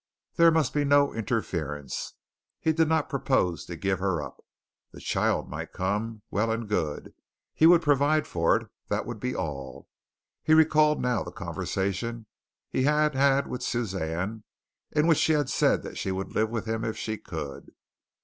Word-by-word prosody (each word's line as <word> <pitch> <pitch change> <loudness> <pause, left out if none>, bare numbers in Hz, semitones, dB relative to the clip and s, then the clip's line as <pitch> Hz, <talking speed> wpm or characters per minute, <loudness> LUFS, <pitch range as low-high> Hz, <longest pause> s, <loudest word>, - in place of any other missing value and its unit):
There 170 -1 +6
must 160 -4 +1
be 145 - +1
no 145 0 +4
interference. 80 - -3 0.4
He 160 - +1
did 160 0 +3
not 160 0 +2
propose 130 - 0
to 85 - -6
give 95 +2 -1
her 95 -3 0
up. 75 - -8 0.5
The - - -11
child - - 0
might - - -6
come. 105 +3 -2
Well 110 +3 +1
and 115 0 -2
good. 80 -8 -2 0.4
He 160 - +5
would 170 0 +6
provide 145 +1 +3
for 85 -1 +2
it, - - -8 0.2
that - - -1
would 120 -3 -6
be 125 +3 -2
all. 70 -6 -5 0.5
He 155 - +4
recalled 155 -1 +4
now 125 -5 +1
the - - -7
conversation 110 +4 -3 0.4
he - - -1
had 150 +2 +3
had 140 +1 +3
with 125 - -5
Suzanne 95 -3 -2 0.5
in 150 0 +2
which 165 -3 +4
she 160 - +3
had 145 -3 +1
said - - +2
that - - -7
she 95 - -2
would 95 0 -4
live 110 +1 +1
with 115 -1 -3
him 110 0 -2
if 110 - -3
she 110 -2 -4
could. 75 -8 -7
115 Hz, 175 wpm, -27 LUFS, 95-145 Hz, 0.5 s, There